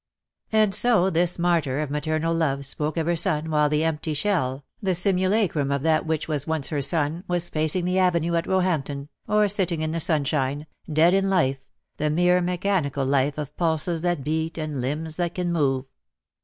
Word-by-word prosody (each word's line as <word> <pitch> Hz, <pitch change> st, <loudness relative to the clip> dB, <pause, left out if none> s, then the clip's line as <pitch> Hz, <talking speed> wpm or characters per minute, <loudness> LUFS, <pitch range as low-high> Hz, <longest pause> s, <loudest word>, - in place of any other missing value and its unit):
And 215 Hz, -2 st, +3 dB
so 210 Hz, -4 st, +4 dB
this 175 Hz, +1 st, +1 dB
martyr 165 Hz, -6 st, +1 dB
of 150 Hz, -2 st, -3 dB
maternal 155 Hz, +2 st, -1 dB
love 140 Hz, -4 st, 0 dB
spoke 150 Hz, +3 st, -3 dB
of 160 Hz, -, 0 dB
her 170 Hz, +1 st, +1 dB
son 160 Hz, -1 st, 0 dB
while 150 Hz, -1 st, +3 dB
the 150 Hz, +1 st, +1 dB
empty 160 Hz, -1 st, -2 dB
shell, 140 Hz, -6 st, -1 dB, 0.2 s
the 190 Hz, -3 st, 0 dB
simulacrum 185 Hz, -5 st, +1 dB
of 140 Hz, -1 st, -1 dB
that 160 Hz, 0 st, +2 dB
which 160 Hz, -1 st, -1 dB
was 150 Hz, -2 st, -3 dB
once 160 Hz, -3 st, -2 dB
her 145 Hz, -3 st, -1 dB
son, 150 Hz, +4 st, -1 dB
was 175 Hz, -1 st, -1 dB
pacing 155 Hz, +3 st, +1 dB
the 180 Hz, +1 st, +1 dB
avenue 170 Hz, -2 st, +2 dB
at 170 Hz, 0 st, 0 dB
Roehampton, 150 Hz, -7 st, -1 dB, 0.2 s
or 210 Hz, 0 st, +3 dB
sitting 185 Hz, -5 st, 0 dB
in 155 Hz, -, -1 dB
the 165 Hz, -, -2 dB
sunshine, 145 Hz, -2 st, 0 dB, 0.3 s
dead 160 Hz, +4 st, +4 dB
in 195 Hz, 0 st, +2 dB
life, 135 Hz, -8 st, +1 dB, 0.4 s
the 150 Hz, -, 0 dB
mere 180 Hz, +3 st, +3 dB
mechanical 175 Hz, -6 st, -1 dB
life 140 Hz, +1 st, +1 dB
of 150 Hz, -1 st, -6 dB
pulses 165 Hz, 0 st, 0 dB
that 175 Hz, -5 st, -1 dB
beat 160 Hz, +3 st, -2 dB
and 155 Hz, -4 st, -3 dB
limbs 155 Hz, +5 st, -3 dB
that 175 Hz, -1 st, -2 dB
can 175 Hz, -1 st, -1 dB
move. 135 Hz, -5 st, +1 dB
160 Hz, 185 wpm, -24 LUFS, 150-180 Hz, 0.4 s, so